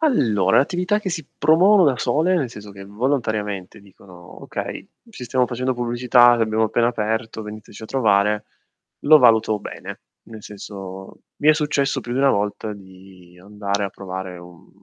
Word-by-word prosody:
Allora, 110 - +2
l'attività 180 +7 +1
che 195 -3 -4
si 160 -2 -4
promuovono 185 +5 +5
da 135 -5 +2
sole, 165 +5 +1
nel 140 -9 -1
senso 105 -2 -11
che 100 0 -11
volontariamente 105 -4 -3
dicono: 95 -3 -16
"Okay, - - -6 0.3
ci 165 - -11
stiamo 125 +1 +1
facendo 125 +2 -2
pubblicità, 120 0 +4
l'abbiamo 110 -1 +1
appena 115 +2 +1
aperto, 110 -1 -3
veniteci 105 0 -10
a - - -8
trovare." 105 -4 +1 0.6
Lo 155 +1 +6
valuto 110 -4 +4
bene. - - -9 0.2
Nel 110 -2 -12
senso, 95 -2 -10 0.2
mi 150 - +1
è 155 - +7
successo 145 -3 0
più 120 - -7
di 125 - -1
1 135 0 +4
volta 105 0 -2
di 95 -2 -16
andare 100 +1 -3
a - - -2
provare 95 -1 -7
un 85 -1 -15
110 Hz, 160 wpm, -21 LUFS, 100-130 Hz, 0.6 s, è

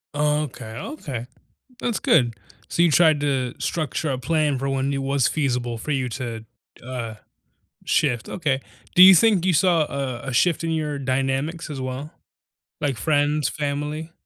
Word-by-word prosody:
Okay, 150 -4 -1
okay. 135 - -6 0.6
That's 235 -3 -1
good. 120 -3 +3 0.3
So 170 - +1
you 170 - +5
tried 155 -1 +4
to 130 -4 -1
structure 155 -1 -2
a 130 - -1
plan 150 0 +1
for 135 +2 -2
when 135 0 0
it 140 - -1
was 135 -1 +1
feasible 125 -5 -1
for 130 - -6
you 135 -3 0
to, 115 -2 -5 0.4
uh, 120 -3 -5 0.7
shift, 125 -5 +1
okay. 140 -6 -1 0.3
Do 180 - +9
you 190 +1 +11
think 190 -1 +4
you 185 - +3
saw, 170 +1 +3
uh, 135 -5 -3
a 135 - -4
shift 170 +6 +2
in 165 - -1
your 155 -2 -1
dynamics, 135 +5 -1
as 140 -3 -5
well? 130 +4 -5 0.7
Like, 140 -4 -1
friends, 145 +4 +1
family? 150 +2 -3
140 Hz, 160 wpm, -23 LUFS, 130-155 Hz, 0.7 s, you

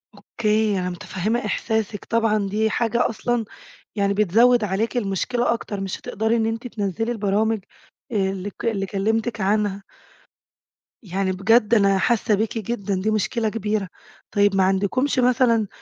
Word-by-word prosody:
أوكي، 215 -2 0
أنا 180 0 -2
مُتَفهمة 190 +6 -3
إِحْسَاسِك 220 -2 -2
طبعًا، 220 -3 +1
دي 215 +3 0
حاجة 235 +1 +1
أصلًا 240 0 -1 0.5
يعني 200 -1 +1
بتزود 220 +4 +4
عليكِ 210 +5 -1
المُشكلة 235 +3 0
أكتر 205 -3 -5
مش 195 -1 -4
هتقدري 220 +2 -1
إن 225 -1 +1
أنتِ 225 +2 -3
تنزِلي 225 +1 -2
البرامج 220 0 0 0.5
اللي 195 -2 -1
ك - - -9
اللي 205 -4 0
كَلمتِك 220 +3 -1
عنها. 200 0 0 1.2
يعني 190 -1 -1
بجد 215 +4 +3
أنا 200 -3 +4
حاسة 220 +1 +2
بيكِ 220 +3 -2
جدًا، 205 -2 -2
دي 215 +3 0
مُشكلة 215 +2 0
كبيرة. 210 -3 -2 0.4
طيب، 205 -1 +3
ما 190 - +4
عندكُمش 200 +9 +1
مثلًا 240 -3 +3
215 Hz, 140 wpm, -22 LUFS, 195-230 Hz, 1.2 s, بتزود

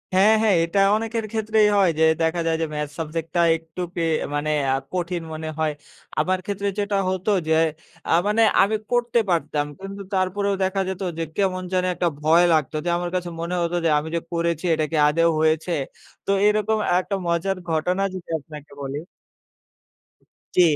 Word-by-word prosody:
হ্যাঁ 205 +4 +6
হ্যাঁ, 210 -4 +4
এটা 170 +4 0 0.2
অনেকের 225 0 -2
ক্ষেত্রেই 220 -1 +2
হয় 190 -3 +5
যে - - +4 0.2
দেখা 165 +1 +1
যায় 160 0 +1
যে - - +1
ম্যাথস 150 -1 -4
সাবজেক্টটা 165 +2 -2 0.2
একটু 165 +2 -9
পেয়ে 165 -2 +1 0.2
মানে 155 +1 -1 0.2
আ - - +3 0.2
কঠিন 175 -1 -2
মনে 155 0 -5
হয়। 155 -1 +1 0.5
আমার 185 0 +2
ক্ষেত্রে 200 0 -2
যেটা 205 -1 0
হতো 185 +3 -1 0.2
যে, 160 - +3 0.6
আ - - +1 0.2
মানে 215 +2 +2 0.2
আমি 210 +3 +3 0.2
করতে 240 -1 +2
পারতাম। 150 -3 0
কিন্তু 195 +1 -7
তারপরেও 195 +2 0
দেখা 190 +1 0
যেত 190 +1 -5 0.2
যে - - 0
কেমন 185 -2 0
জানি 185 0 +1
একটা 175 - 0
ভয় 165 +3 +5
লাগত, 155 -1 +1
যে - - 0
আমার 175 0 -3
কাছে 180 -1 -2
মনে 175 +2 -2
হত 170 0 -1
যে - - +4
আমি 155 - -6
যে - - +1
করেছি, 170 0 -1
এটা 155 -1 +1
কি 160 - 0
আদৌ 165 +3 +3
হয়েছে? 160 +2 +1 0.5
তো 195 - 0 0.2
এরকম 215 +1 +2 0.2
একটা 195 +2 -3
মজার 175 +3 0
ঘটনা 180 +5 0
যদি 185 -2 -8
আপনাকে 150 -1 -12
বলি। 135 +1 -4 1.6
জী। 180 - +6
175 Hz, 175 wpm, -23 LUFS, 160-200 Hz, 1.6 s, হ্যাঁ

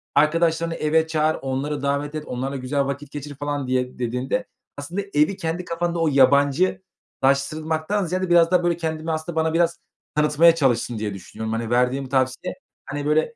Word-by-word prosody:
arkadaşlarını 165 +2 +2
eve 160 +1 +2
çağır, 155 0 +1
onları 135 +2 -2
davet 140 +1 -1
et, 155 -1 -4
onlarla 130 +2 -4
güzel 135 +1 -1
vakit 140 +1 -5
geçir." 145 -1 -7
falan 145 -1 -3
diye, 125 -1 -1
dediğinde 125 - -1 0.3
aslında 170 +8 -4
evi 150 +6 +2
kendi 165 +2 -3
kafanda 170 0 -2
o 165 - +2
yabancı 140 +6 +3 0.4
laştırılmaktan 155 +7 +1
ziyade 185 +2 -2
biraz 170 -1 +5
daha, 180 -1 +3
böyle, 175 -1 +1
kendimi 160 -1 -3
aslında 160 +1 -3
bana 160 0 +1
biraz 170 0 +2 0.4
tanıtmaya 150 +2 +5
çalıştın 120 -6 +1
diye 105 -2 -3
düşünüyorum. 110 +4 -6
Hani, 115 0 -2
verdiğin 125 +3 +1
bu 130 - -11
tavsiye, 130 +5 0 0.3
hani, 145 0 -4
böyle, 155 +10 +1
150 Hz, 170 wpm, -23 LUFS, 135-165 Hz, 0.4 s, biraz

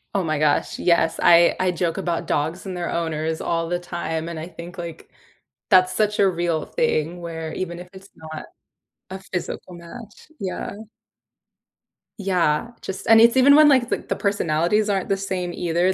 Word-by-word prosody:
Oh, 195 - +1
my 155 -3 -1
gosh, 150 -1 +1
yes, 170 -2 +2
I 170 0 +6
I 185 - +2
joke 175 0 -2
about 175 -3 -2
dogs 160 +6 -2
and 190 -1 -5
their 175 -1 -3
owners 160 -1 -2
all 165 0 -1
the 175 - 0
time, 170 -2 -4
and 170 -1 -5
I 160 - -6
think, 175 +1 -10
like, 170 -2 -8 0.6
that's 185 -2 +5
such 210 +1 0
a 200 - +5
real 170 -2 -1
thing 175 - -1
where 165 -2 -6
even 175 -1 -4
if 180 0 -10
it's 190 0 -14
not 155 -1 -8 0.7
a 190 - -6
physical 180 -1 -6
match, 205 - -12
yeah. 190 -2 -4 1.5
Yeah, 180 +1 +1
just 190 0 -6
and 225 0 +7
it's 235 +2 +5
even 280 +2 +7
when, 305 0 +7
like, 260 -4 +4
the - - -1
the - - 0
personalities 200 +1 +1
aren't 195 -2 0
the 195 - +1
same 190 -2 -3
either, 175 +2 +1
175 Hz, 175 wpm, -22 LUFS, 165-195 Hz, 1.5 s, and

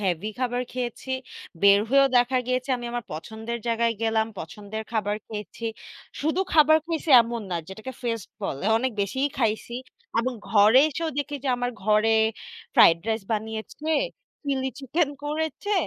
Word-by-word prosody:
Heavy 190 +1 -1
খাবার 250 -1 0
খেয়েছি। 250 +1 -4 0.5
বের 200 0 +7
হয়েও 275 +2 +6
দেখা 245 +1 +3
গিয়েছে 255 +1 -1
আমি 240 - -8
আমার 240 -1 -3
পছন্দের 220 +8 -5
জায়গায় 230 0 +1
গেলাম। 220 -1 +2
পছন্দের 205 +6 -6
খাবার 210 -1 0
খেয়েছি। 210 +1 -7 0.6
শুধু 315 +5 +1
খাবার 310 0 +7
খাইছি 325 -2 -2
এমন 230 -1 -4
না 175 - 0
যেটাকে 220 +7 -7
ফেস্ট 230 -5 -3
বলে 140 - -3
অনেক 260 +2 0
বেশিই 265 +8 0
খাইছি। 225 0 0 0.5
এবং 255 +2 -1 0.2
ঘরে 215 +3 +6
এসেও 320 +2 -3
দেখি 290 0 -2
যে 270 - 0
আমার 245 0 -1
ঘরে 215 +2 +3 0.6
ফ্রাইড 165 0 +7
রাইস 220 -2 0
বানিয়েছে, 220 +8 -4 0.6
চিলি 265 -1 0
চিকেন 285 +4 0 0.2
করেছে, 315 +7 -2
235 Hz, 150 wpm, -25 LUFS, 215-265 Hz, 0.6 s, বের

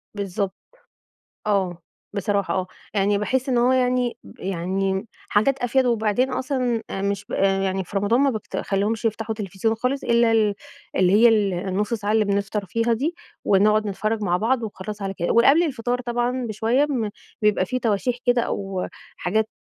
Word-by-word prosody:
بالضبط. 195 0 -2 0.9
آه، 190 -4 +1 0.4
بصراحة 200 0 0
آه. 185 -1 -1 0.3
يعني 200 0 +2
باحس 260 +5 -1
إن 245 -2 +2
هو 250 +2 +4
يعني 250 -1 +1 0.2
يعني 190 +2 -1 0.2
حاجات 260 +6 +2
أفيد 250 +1 +2
وبعدين 235 +2 +1
أصلًا، 255 -4 -1
آآ 195 - -3
مش 200 0 -2
آآ، 195 0 +2
يعني 190 -1 -1
في 200 - -7
رمضان 215 +6 +2
ما 280 -1 +4
بافت 220 -4 -5
ما - - 0
باخليهمش 210 +3 -1
يفتحوا 220 0 -1
تلفزيون 210 +1 -1
خالص 250 +4 -2
إلا 235 -1 +3
ال 210 -2 +3 0.4
اللي 185 0 +4
هي 230 +3 +7
ال 210 -4 +3
النص 195 +5 -1
ساعة 210 -1 -1
اللي 220 -1 +3
بنفطر 200 +1 -1
فيها 230 +5 0
دي، 285 +9 0 0.3
ونقعد 210 +2 +4
نتفرج 215 +2 -2
مع 180 -2 +2
بعض 235 +4 +1
وخلاص 210 -1 -6
على 195 0 -3
كده. 175 -2 -1
ول 235 - +5
قبل 310 +5 +6
الفطار 250 -5 -1
طبعًا 240 +1 -1
بشوية 225 +6 +1
بن 240 -8 -1 0.3
بيبقى 210 -3 +3
في 255 - -1
تواشيح 235 +1 0
كده 245 -1 +4
أو 195 -4 -3 0.3
حاجات، 215 +4 0
215 Hz, 175 wpm, -23 LUFS, 195-240 Hz, 0.9 s, هي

